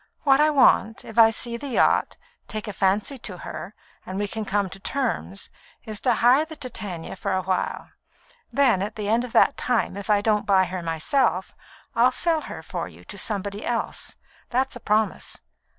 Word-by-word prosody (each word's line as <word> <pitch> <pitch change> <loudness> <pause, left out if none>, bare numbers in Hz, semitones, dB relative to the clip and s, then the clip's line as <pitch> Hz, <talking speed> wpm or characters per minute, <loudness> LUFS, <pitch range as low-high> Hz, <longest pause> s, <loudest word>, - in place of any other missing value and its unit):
What 270 -1 +5
I 305 +1 +5
want, 260 -5 +3
if 225 +1 -2
I 225 -1 +9
see 235 +1 -2
the 285 - -6
yacht, 255 - +2 0.3
take 215 -1 -5
fancy 210 +5 0
to 190 -6 -5
her, 185 +3 -8 0.3
and 185 - -6
we 205 +1 -1
can 220 +1 -4
come 200 0 0
to 195 - -9
terms, 230 -4 -3 0.3
is 215 -2 -4
to 245 -3 +2
hire 250 +7 +5
the 315 0 -9
Titania 210 - -5
for 195 +1 -2
a 185 - -1
while. 185 0 -2 0.6
Then, 255 -9 +3
at 210 +2 -3
the 210 -2 -4
end 230 +3 +2
of 250 - -7
that 280 - +4
time, 245 -6 0
if 200 0 -7
I 205 -1 +4
don't 210 -1 +1
buy 190 -2 +5
her 180 0 -5
myself, 175 - 0 0.4
I'll 240 +2 +5
sell 325 +3 +1
her - - -7
for - - -4
you - - -15
to - - -9
somebody 205 -2 -2
else; 235 -2 -3 0.3
that's 260 +2 0
a - - -7
promise. 215 -1 -1
215 Hz, 190 wpm, -24 LUFS, 195-250 Hz, 0.6 s, I